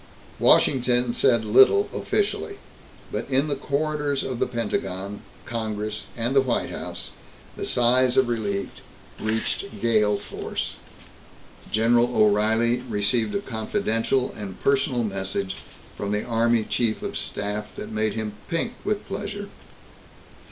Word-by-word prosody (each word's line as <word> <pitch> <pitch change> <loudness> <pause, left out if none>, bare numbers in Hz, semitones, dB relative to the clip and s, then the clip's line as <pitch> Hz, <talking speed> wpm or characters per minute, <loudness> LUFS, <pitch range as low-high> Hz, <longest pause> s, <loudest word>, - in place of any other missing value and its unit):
Washington 125 -2 +4
said 115 -3 +3
little 130 - +6
officially, 405 0 -1 0.5
but - - -3
in 135 +3 +2
the 140 - 0
corridors 145 0 -1
of 130 -3 -4
the - - +2
Pentagon, 100 -4 -3 0.2
Congress 110 -2 -3
and 120 +3 0
the 135 - +7
White 125 -3 -1
House, - - -6 0.4
the - - -4
sighs 125 +1 +3
of 130 -2 +5
relief 105 -4 -1 0.5
reached 110 -1 -2
gale 105 -2 +3
force. - - -5 0.9
General 120 +2 +3
O'Reilly 110 +3 +4
received 105 - +1
a 200 - 0
confidential 115 - -1
and 100 -3 -7
personal 135 -3 +2
message 95 -2 -3 0.4
from 100 0 -3
the 105 0 0
Army 115 -1 +2
Chief 110 0 -1
of - - -4
Staff 105 +1 -4
that - - -7
made 110 -1 0
him 110 -2 -3 0.2
pink 180 +8 -1
with 210 -1 -1
pleasure. 205 0 -5
115 Hz, 125 wpm, -25 LUFS, 105-130 Hz, 0.9 s, the